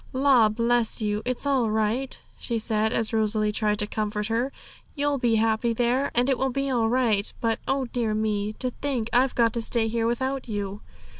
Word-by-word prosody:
'La, 260 -4 +4
bless 230 +1 +1
you, 210 -1 -1
it's 255 +2 -1
all 265 -5 +2
right!' 220 +5 -1 0.2
she 235 - -2
said, 220 -1 0
as 230 -2 0
Rosalie 215 -1 +1
tried 210 0 0
to 210 - +1
comfort 210 0 -3
her; 240 +4 0 0.4
'you'll 290 -1 0
be 240 -3 +2
happy 225 +1 +1
there, 245 +4 +1
and 245 +2 +3
it 265 -3 +1
will 265 - +1
be 275 +1 -2
all 230 -3 +1
right. 230 -5 +1
But, 225 -1 0
oh 270 -1 0
dear 230 -3 -1
me! 215 -1 -1
to 255 +3 -2
think 245 -4 -3
I've 255 +2 +3
got 230 -2 +3
to 235 - -1
stay 225 0 0
here 225 0 0
without 260 +3 -2
you!' 205 -1 -4
230 Hz, 200 wpm, -25 LUFS, 215-255 Hz, 0.4 s, La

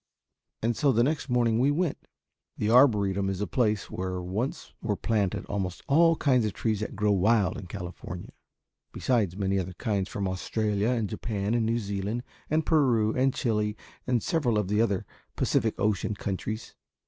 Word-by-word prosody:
And 115 +1 +1
so 140 +2 +3
the 120 -1 +3
next 145 0 -1
morning 120 -2 +2
we 135 +3 +4
went. 160 +1 -1 0.5
The 105 - 0
Arboretum 100 -6 +4
is 95 -1 -3
a 105 - 0
place 110 -5 0
where 90 0 -3
once 95 +9 -4
were 105 -3 -1
planted 105 -3 -1
almost 95 -3 -3
all 165 +3 +5
the - - -10
kinds 130 -4 +4
of 105 -2 -1
trees 110 -2 -1
that 110 - -4
grow 105 +1 +2
wild 100 +1 +3
in 95 - -7
California, 90 -1 -7 0.6
besides 105 -8 0
many 100 -1 +1
other 95 0 -4
kinds 100 0 -1
from 100 -1 -2
Australia 105 +3 -1
and 115 -4 0
Japan 105 0 -2
and 115 -2 +1
New 115 +1 +1
Zealand 100 +2 -3 0.3
and 155 +1 +1
Peru 120 -9 +3
and 130 +1 +3
Chili 105 -5 -1 0.3
and 125 -3 +1
several 130 -10 +1
of 105 -3 0
the 105 +1 +2
other 100 -5 0 0.3
Pacific - - +1
Ocean 105 0 0
countries. 105 +3 -4
110 Hz, 175 wpm, -28 LUFS, 100-120 Hz, 0.6 s, all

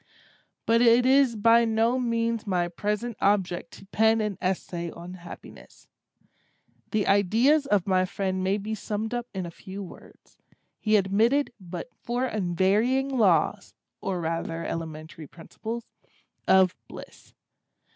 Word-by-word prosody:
But 230 +1 +3
it 240 +1 +5
is 265 -2 +4
by 230 +2 +5
no 230 +2 +1
means 230 -2 -1
my 180 -3 +1
present 210 +6 -3
object 190 -4 +1
to - - -13
pen 220 +3 +2
an 210 -2 -1
essay 175 -2 -2
on 175 +2 -9
Happiness. 175 -2 -13 1.0
The 215 -2 0
ideas 230 - +3
of 205 -7 +2
my 185 -1 +2
friend 185 0 -2
may 190 +2 +1
be 210 +2 -5
summed 215 +2 -4
up 240 0 -3
in 190 -2 -4
a 170 - -7
few 195 +3 -8
words. 180 - -15 0.4
He 215 0 +2
admitted 220 +8 +2
but 180 +5 -8
four 245 +2 -3
unvarying 215 +6 +1
laws, 200 - +1 0.3
or 190 -2 -2
rather 165 0 -3
elementary 160 -1 -6
principles, 225 +9 -7 0.6
of 190 -1 +5
Bliss. - - -13
205 Hz, 135 wpm, -26 LUFS, 185-230 Hz, 1.0 s, it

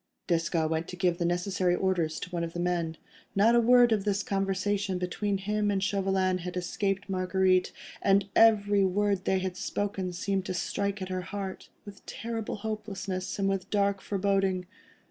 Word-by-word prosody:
Desgas 165 -2 +1
went 160 +1 -2
to - - -7
give 180 -1 0
the 170 - 0
necessary 175 +1 +1
orders 175 -4 0
to - - -6
one 170 -1 -2
of 165 0 -4
the 175 - -4
men. 170 -2 -1 0.4
Not 215 +4 +5
a 240 - +6
word 240 0 +6
of 210 -3 +2
this 200 0 0
conversation 195 0 -1
between 195 +3 -1
him 210 +2 -1
and 195 -1 0
Chauvelin 190 -2 +1
had 180 +1 -5
escaped 195 +2 -2
Marguerite, 185 -1 +2 0.3
and 200 0 +3
every 205 -3 +5
word 200 0 +1
they 190 - +2
had 185 -1 -3
spoken 195 -1 -2
seemed 190 +2 -2
to 185 - -3
strike 200 +3 -2
at 185 - -6
her 185 0 -2
heart, 190 0 -6 0.2
with 200 -1 -11
terrible 225 -1 -4
hopelessness 200 -3 -4
and 195 -1 -1
dark 200 -1 +1
foreboding. 195 -2 0
195 Hz, 170 wpm, -29 LUFS, 180-200 Hz, 0.4 s, a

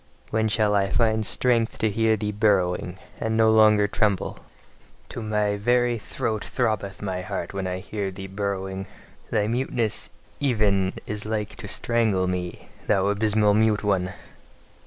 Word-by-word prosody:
When 110 0 +1
shall 105 -1 +2
I 100 -1 +2
find 110 0 +2
strength 115 +1 +1
to 110 - +1
hear 110 +1 +2
thee 105 0 -2
burrowing, 95 -4 +1 0.2
and 110 0 -1
no 110 0 +5
longer 110 -1 +5
tremble? 105 -2 0 0.7
To - - -6
my 105 -1 0
very 120 +2 +2
throat 110 0 -3
throbbeth 105 -5 -2
my 95 -2 -2
heart 85 -1 -4
when 95 -1 -3
I 90 0 -2
hear 100 +1 -4
thee 95 +1 -8
burrowing! 95 -1 -3 0.4
Thy 105 -3 +1
muteness 120 -1 0 0.3
even 105 -8 +2
is 105 0 -4
like 110 -1 -2
to 115 -3 -8
strangle 110 -4 +1
me, 90 -1 -4 0.2
thou 100 -2 +3
abysmal 105 0 +3
mute 110 0 +2
one! 95 -2 0
105 Hz, 150 wpm, -25 LUFS, 95-110 Hz, 0.7 s, no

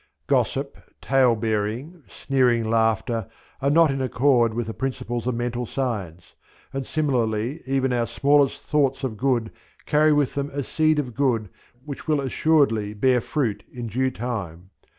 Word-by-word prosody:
Gossip, - - 0 0.2
tale 130 -3 +3
bearing, 110 - -2
sneering 125 -4 +1
laughter, 115 -1 +1 0.3
are 140 - +2
not 160 0 +5
in 135 0 -2
accord 125 -2 +3
with 115 +1 -3
the 110 - -5
principles 120 -2 -3
of 125 - 0
Mental 120 0 -2
Science; 100 -12 -4 0.4
and 135 -1 -4
similarly 125 -2 -1
even 130 -1 +1
our 120 -1 0
smallest 140 +4 +2
thoughts 140 -3 +1
of 125 -5 -2
good 120 -1 0 0.3
carry 155 +1 +4
with 145 -3 +2
them 140 0 -2
a 140 0 -2
seed 155 +3 +1
of 130 -5 -2
good 115 -6 0 0.4
which 145 +1 -8
will 155 -2 +2
assuredly 135 -7 +1
bear 125 +3 +3
fruit 120 -5 -2
in 120 -1 -6
due 130 +4 0
time. 100 -8 -5
125 Hz, 150 wpm, -24 LUFS, 115-140 Hz, 0.4 s, not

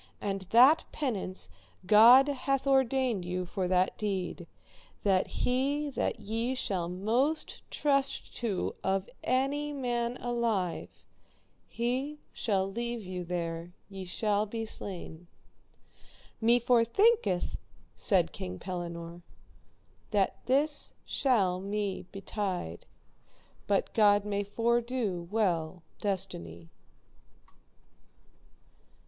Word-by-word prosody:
And 195 -2 -3
that 260 +8 +7
penance 210 -10 -2 0.4
God 235 +7 +8
hath 275 -1 -1
ordained 265 -6 +2
you 180 +1 -3
for 185 +1 -2
that 185 0 +1
deed, 190 -4 -3 0.6
that 190 -2 +3
he 280 +4 0
that - - -1
ye 230 +5 -2
shall 185 -8 -1
most 235 - 0
trust 275 -2 0
to 215 -6 -1
of 190 0 0 0.2
any 280 +3 0
man 245 -3 -1
alive, 230 -7 -1 0.8
he 255 +5 -2 0.2
shall 195 -4 0
leave 235 +1 -4
you 180 -1 -4
there 170 0 -4 0.2
ye 195 -1 -6
shall 210 +3 0
be 225 +2 -4
slain. 175 -5 -6 1.1
Me 235 +2 +5
forthinketh, 245 - +3 0.4
said 170 - +2
King 90 0 -6
Pellinore, 170 - -6 0.9
that 200 -3 0
this 285 +3 +1
shall 200 -9 +2
me 200 -2 -3
betide, 195 - -4 0.8
but 200 -1 +1
God 205 -2 +5
may 205 -1 -1
fordo 230 -3 0
well 180 -5 0 0.2
destiny. 85 - -4
210 Hz, 95 wpm, -30 LUFS, 185-250 Hz, 1.1 s, God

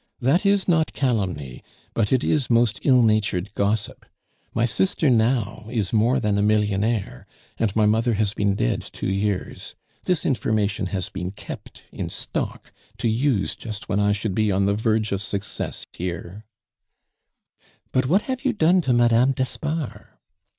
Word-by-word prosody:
"That 145 +10 +2
is 200 -1 +2
not 165 -4 +2
calumny, 95 - -2 0.3
but 110 -3 0
it 130 -2 +3
is 145 -5 +1
most 115 -3 +3
ill 130 -3 +5
natured 105 -3 +1
gossip. 105 +1 -1 0.5
My 115 - +1
sister 150 - +1
now 110 -2 +1
is 110 -5 -2
a - - +2
more 120 +5 +3
than 105 -3 +1
millionaire, 105 - 0 0.3
and 110 -3 0
my 110 -1 +4
mother 110 +2 +2
has 105 -1 0
been 100 -2 +1
dead - - 0
two - - -8
years. 100 0 -2 0.3
This 180 -3 0
information 105 -6 0
has 90 0 -3
been 90 -2 -4
kept 100 - -10
in - - -4
stock - - -5 0.2
to - - -1
use 115 -2 +1
just 110 -2 -7
when 100 -1 +1
I 105 0 +3
should 105 -1 -1
be 110 +1 +1
on 95 +1 +2
the 100 - +2
verge 110 0 0
of 100 -1 -1
success 100 0 -4
here 90 +4 -6 0.7
" - - -36
"But 130 0 +1
what 190 +9 +3
have 260 0 -4
you 265 -2 +1
done 180 -2 +4
to 130 -6 +1
Madame 120 +2 +4
d'Espard?" 135 +3 -3
110 Hz, 165 wpm, -23 LUFS, 100-130 Hz, 0.7 s, ill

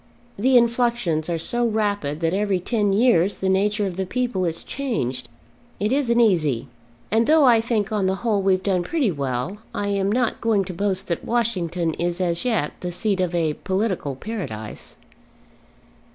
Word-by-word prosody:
The 255 +5 +4
influxions 235 -9 +1
are 170 - 0
so 240 +9 -1
rapid, 205 -9 -1
that 165 +1 +1
every 200 -1 +1
ten 205 +1 0
years 200 -3 +3
the 190 - -1
nature 205 +2 +1
of 185 -2 -4
the 190 - -1
people 240 -5 -1
is 165 -1 -3
changed. 130 - -3 0.5
It 210 +3 0
isn't 250 -4 +2
easy; 155 - +2 0.4
and 225 +2 +2
though 310 -2 +5
I 235 -3 +5
think 225 -2 -1
on 205 -3 +1
the 190 - +1
whole 210 -4 +2
we've 190 -1 +2
done 190 -3 +1
pretty 260 - 0
well, 140 +6 -3 0.2
I 205 0 -1
am 200 0 0
not 245 0 0
going 215 -4 +2
to 185 - -6
boast 190 +1 -1
that 170 - -2
Washington 180 -8 -1
is 175 +2 -2
as 170 -2 0
yet 235 -4 0
the 180 - -4
seat 195 +2 -1
of 180 -1 -1
a 160 -3 +1
political 190 -6 -2
Paradise." 130 - -7
195 Hz, 175 wpm, -23 LUFS, 175-230 Hz, 0.5 s, though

